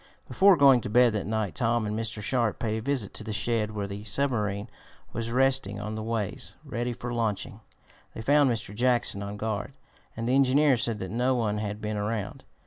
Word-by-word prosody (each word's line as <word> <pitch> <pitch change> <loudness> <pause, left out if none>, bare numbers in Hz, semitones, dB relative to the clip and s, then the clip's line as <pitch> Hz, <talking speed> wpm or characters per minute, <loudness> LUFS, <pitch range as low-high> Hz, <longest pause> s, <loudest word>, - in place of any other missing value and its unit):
Before 195 -2 +5
going 135 -4 +6
to - - -5
bed 120 +1 +5
that 105 -3 -2
night 110 -3 -1
Tom 115 -1 +1
and 105 0 -2
Mr. 110 -1 -3
Sharp 120 -1 0
paid 110 -1 -2
a - - -4
visit 125 -5 -2
to - - -6
the 110 - -5
shed 110 0 0
where 100 -1 -2
the 100 +1 -7
submarine 105 -5 -1 0.5
was 115 0 -3
resting 130 -5 +1
on 105 +1 -4
the 110 - -4
ways, 110 -3 -3
ready 120 +1 -2
for 120 +1 -5
launching. 110 -4 -2 0.6
They 110 - -6
found 145 +2 +4
Mr. 115 -3 -2
Jackson 120 -3 +1
on 100 +1 -5
guard 110 +4 -3 0.4
and 115 0 -3
the 125 - +2
engineer 135 +1 +4
said 115 -1 0
that 95 - -5
no 125 +3 +1
one 105 -3 0
had 105 0 -4
been 105 0 -3
around. 105 0 -3
115 Hz, 205 wpm, -27 LUFS, 105-125 Hz, 0.6 s, going